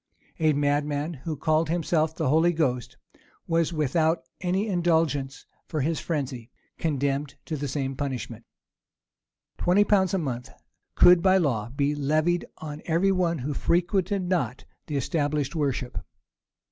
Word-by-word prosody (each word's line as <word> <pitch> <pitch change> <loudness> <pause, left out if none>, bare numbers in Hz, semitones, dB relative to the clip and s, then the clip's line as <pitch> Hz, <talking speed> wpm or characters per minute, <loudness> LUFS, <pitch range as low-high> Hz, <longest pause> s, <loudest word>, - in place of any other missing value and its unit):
A 155 -1 +3
madman, 145 +2 0
who 155 +2 -5
called 155 +1 +1
himself 160 -1 +1
the 160 - -1
Holy 160 +4 +4
Ghost, 130 -7 -1 0.5
was 165 0 +1
without 160 0 +1 0.2
any 185 +3 0
indulgence 160 -7 0 0.2
for 155 - -2
his 155 +3 0
frenzy, 130 -7 -3 0.3
condemned 140 -2 -1
to 160 - -3
the 145 -1 -3
same 135 -1 -2
punishment. 125 -5 -4 1.2
Twenty 185 +4 +4
pounds 195 -3 +2
a - - +2
month 125 -7 -3 0.5
could, 175 -1 +7
by 190 +1 +5
law, 120 - 0
be 140 +3 0
levied 155 +4 +1
on 150 -1 -7
every 175 +4 +2
one 175 -3 +1
who 145 +2 -3
frequented 185 +5 +1
not 165 -9 -1 0.2
the 150 - -2
established 145 0 -1
worship. 135 -4 -1
155 Hz, 135 wpm, -26 LUFS, 140-170 Hz, 1.2 s, could